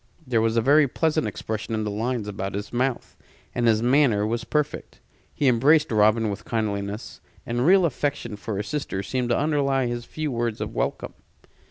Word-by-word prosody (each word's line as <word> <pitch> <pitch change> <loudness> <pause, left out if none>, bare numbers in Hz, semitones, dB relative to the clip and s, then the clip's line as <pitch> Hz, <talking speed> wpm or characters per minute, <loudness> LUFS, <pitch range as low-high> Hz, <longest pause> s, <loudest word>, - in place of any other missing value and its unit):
There 120 -4 +1
was 115 +1 +1
a - - +4
very 145 +3 +5
pleasant 155 +3 0
expression 110 +1 -4
in 110 - -1
the 105 - -2
lines 115 +1 -2
about 100 -1 -4
his 100 +2 -5
mouth, 125 +1 -1 0.4
and 120 -1 +1
his 110 0 +3
manner 125 -5 +3
was 115 +2 -2
perfect. 150 -1 -2 0.3
He 145 - 0
embraced 145 +6 +4
Robin 110 0 +3
with 100 - -6
kindliness; 105 -2 -3 0.2
and 120 +4 0
real 190 0 +6
affection 140 -6 -2
for 105 0 -5
his 105 - -3
sister 140 -10 -3
seemed 125 +4 -2
to 120 - +2
underlie 140 -3 +1
his 120 0 -3
few 155 -2 -4
words 115 -2 -2
of - - -4
welcome. - - -2
120 Hz, 185 wpm, -24 LUFS, 110-140 Hz, 0.4 s, real